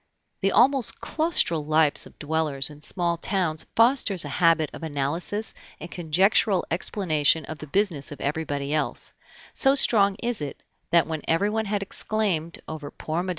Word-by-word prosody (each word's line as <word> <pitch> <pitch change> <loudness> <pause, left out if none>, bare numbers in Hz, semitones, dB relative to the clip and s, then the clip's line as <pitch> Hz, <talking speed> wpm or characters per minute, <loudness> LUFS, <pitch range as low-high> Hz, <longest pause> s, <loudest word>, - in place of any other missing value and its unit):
The 195 0 +1
almost 265 0 +3
claustral 310 - 0
lives 155 0 +2
of - - -20
dwellers 150 -2 -2
in 150 0 -14
small 170 +1 -2
towns 170 -3 -2
fosters 230 - +3
a - - -5
habit 165 0 +2
of - - -9
analysis 160 +8 -2 0.3
and 175 - -9
conjectural 185 +4 +2
explanation 160 -4 +1
of 155 +1 -8
the 155 - -8
business 165 -4 0
of 145 - -9
everybody 145 -1 -3
else; 155 - 0 0.4
so 270 0 +4
strong 200 -7 +5
is 235 -3 -2
it, 145 - -7 0.3
that 170 0 +4
when 160 -1 -4
everyone 210 +6 +1
had 200 -1 -2
exclaimed 195 -6 -1
over 150 -2 -7
poor 160 +3 -4
Mme. 185 - -5
170 Hz, 155 wpm, -25 LUFS, 155-200 Hz, 0.4 s, strong